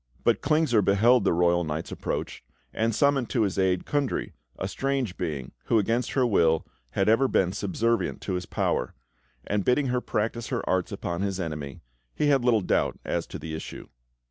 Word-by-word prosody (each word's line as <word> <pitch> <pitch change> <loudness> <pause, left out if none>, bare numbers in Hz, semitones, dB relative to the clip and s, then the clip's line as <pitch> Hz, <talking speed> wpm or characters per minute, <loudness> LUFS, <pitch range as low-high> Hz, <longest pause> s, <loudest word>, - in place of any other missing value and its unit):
But - - +2
Klingsor 150 -6 +3
beheld 110 +3 +4
the - - +4
royal 85 0 +3
knight's 80 0 -4
approach - - -4 0.3
and 115 0 0
summoned 140 -3 +2
to 120 -4 +1
his 100 -2 -1
aid 95 -1 +1
Kundry, 145 -3 -1 0.2
a - - -3
strange 135 -8 -1
being, 75 -7 -4
who, 115 - +3
against 115 +4 0
her 130 -2 +3
will, 80 -8 +3 0.3
had 95 - +1
ever 115 +5 +4
been 90 -7 +2
subservient 110 +4 -1
to 95 - -3
his 90 0 -3
power; - - -1 0.5
and 105 -1 0
bidding 130 +4 +2
her 125 0 0
practice 115 +1 -2
her 120 -5 -3
arts 95 -1 0
upon 85 +1 -3
his 100 -1 -1
enemy, 75 -5 -5 0.3
he 150 - +2
had 135 -3 +3
little 120 -3 +3
doubt - - 0
as - - -2
to - - -7
the 80 0 -7
issue. 80 - -7
105 Hz, 185 wpm, -26 LUFS, 90-125 Hz, 0.5 s, beheld